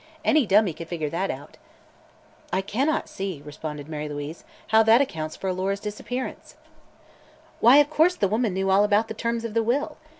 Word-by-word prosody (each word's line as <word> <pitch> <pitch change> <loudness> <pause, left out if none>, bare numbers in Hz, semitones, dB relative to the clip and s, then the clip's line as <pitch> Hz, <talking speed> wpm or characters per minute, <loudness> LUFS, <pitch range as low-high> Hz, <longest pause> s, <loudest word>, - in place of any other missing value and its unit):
Any 300 -7 +3
dummy 195 -2 +4
could 165 +2 -9
figure 160 -4 -3
that 185 +4 -1
out." 145 +3 -7 0.9
"I 190 - +1
cannot 265 +11 -1
see," 190 -5 -5
responded 150 -1 -7
Mary 150 -1 -5
Louise, 145 +2 -6 0.3
"how 220 0 +6
that 225 +2 +6
accounts 160 - -2
for 195 - -5
Alora's 190 +2 -1
disappearance." 230 +5 -6 1.0
"Why, 245 +5 +7
of 290 0 +4
course 330 +4 +3
the 200 - +1
woman 215 -1 0
knew 190 0 0
all 195 +2 +5
about 210 +2 +2
the - - -3
terms 230 +1 -2
of 225 - -5
the 230 - +2
will. 275 +7 -1
200 Hz, 180 wpm, -25 LUFS, 165-230 Hz, 1.0 s, Why